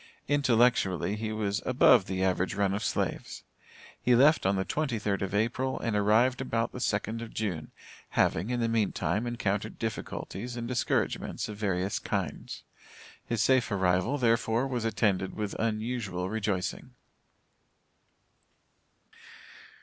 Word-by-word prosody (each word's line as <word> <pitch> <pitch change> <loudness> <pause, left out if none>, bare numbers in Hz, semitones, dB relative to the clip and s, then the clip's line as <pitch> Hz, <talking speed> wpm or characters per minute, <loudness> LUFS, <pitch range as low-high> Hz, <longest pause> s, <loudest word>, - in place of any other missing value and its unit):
Intellectually 120 - +2
he 110 0 -3
was 105 -1 -1
above 125 -4 +5
the 95 0 -2
average 95 +1 0
run 100 -1 +1
of 100 - -2
slaves. - - -2 0.6
He 125 - +4
left 145 -2 +5
on 100 - +2
the 95 0 -1
twenty 145 -6 -1
third 105 -2 -1
of 95 0 -2
April, 120 +5 0
and 115 -3 -1
arrived 110 +6 +3
about 115 -3 -1
the - - -7
second 110 0 -1
of 115 - -8
June, 90 -9 -3 0.5
having, 90 +8 +2
in 125 -1 -1
the 115 - +2
meantime, 105 -2 0
encountered 110 -3 -2
difficulties 115 +1 -5
and 120 0 -4
discouragements 125 -1 -1
of 105 - -7
various 95 -2 -1
kinds. - - -4 0.6
His 115 -3 0
safe 130 -2 +3
arrival, 95 +6 +1
therefore, 115 -1 +2
was 125 -4 -2
attended 100 -4 0
with 105 -2 -3
unusual 110 -4 -2
rejoicing. 100 -4 -3
110 Hz, 135 wpm, -29 LUFS, 100-120 Hz, 0.6 s, above